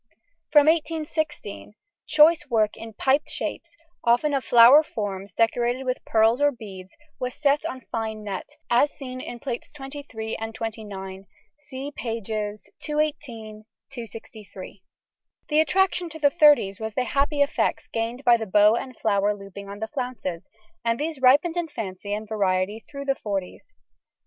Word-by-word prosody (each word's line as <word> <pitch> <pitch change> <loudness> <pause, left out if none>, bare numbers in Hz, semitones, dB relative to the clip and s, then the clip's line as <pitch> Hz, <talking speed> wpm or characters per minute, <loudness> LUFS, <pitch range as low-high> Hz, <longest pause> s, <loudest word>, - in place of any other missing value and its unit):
From 295 -2 +6
1816 310 -8 -1 0.3
choice 305 0 +5
work 215 -3 +2
in 225 0 -9
piped 270 +7 +1
shapes, 340 0 -4 0.3
often 245 +5 +3
of 270 -2 0
flower 240 +5 +8
forms 200 -8 -5
decorated 240 +3 +1
with 255 0 -2
pearls 225 +4 +3
or 290 0 +5
beads, 195 -7 -10 0.3
was 250 -1 -3
set 290 0 +2
on 260 -5 -7
fine 220 -1 -3
net, 200 -2 -5 0.2
as 245 +5 +4
seen 255 -3 -8
in 240 - -7
Plates 245 -1 -5
XXIII 270 -5 -6
and 225 0 -5
XXIX 200 -5 -6 0.3
(see 280 -1 -7
pp. 215 -4 -4 0.2
218, 275 -8 -3 0.3
263). 220 -6 -10 0.7
The 300 0 +3
attraction 360 +2 +1
to 320 - -7
the 290 -2 +3
thirties 290 - +5
was 220 -1 -5
the 255 - +1
happy 285 +3 +2
effects 285 - -1
gained 230 +3 -3
by 240 -3 +6
the 220 -1 -5
bow 210 +3 +5
and 255 0 -5
flower 205 -1 +1
looping 195 0 -10
on 200 - -7
the 220 +1 -4
flounces, 225 - -5 0.3
and 230 0 0
these 305 -2 -3
ripened 290 +7 +5
in 345 -1 0
fancy 200 -7 -6
and 215 +1 -3
variety 200 -1 0
through 280 -1 -7
the 275 - +2
forties. 200 - -5
235 Hz, 150 wpm, -25 LUFS, 210-285 Hz, 0.7 s, flower